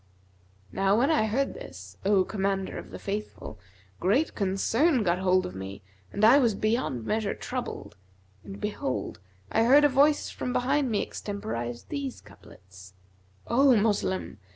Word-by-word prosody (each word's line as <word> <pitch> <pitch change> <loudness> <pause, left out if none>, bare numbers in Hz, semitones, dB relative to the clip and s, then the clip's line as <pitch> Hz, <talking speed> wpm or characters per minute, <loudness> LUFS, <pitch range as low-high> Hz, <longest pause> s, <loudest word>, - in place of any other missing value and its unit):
Now 195 +1 +2
when 270 +7 +3
I 255 -9 +2
heard 265 +6 0
this, 95 +2 -11
O 195 -1 +3
Commander 195 -1 -2
of - - -11
the - - -8
Faithful, 200 - -6 0.4
great 235 - +1
concern 225 - +1
get 175 -1 +1
hold 185 0 +2
of 90 - -6
me 95 +1 -8 0.3
and 205 - +2
I 250 +6 +7
was 235 -6 +2
beyond 215 - -1
measure 215 - -1
troubled, 250 - -6 0.5
and 100 -1 -9
behold, - - -3 0.3
I 225 - +2
heard 270 +6 +6
a 290 - +6
Voice 285 +3 +3
from 250 - -4
behind 270 +2 +1
me 210 -3 0
extemporise 120 - -5
these 280 -3 -5
couplets, 95 0 -16 0.5
'O 260 +2 +4
Moslem! 200 - -1
205 Hz, 150 wpm, -27 LUFS, 175-250 Hz, 0.5 s, I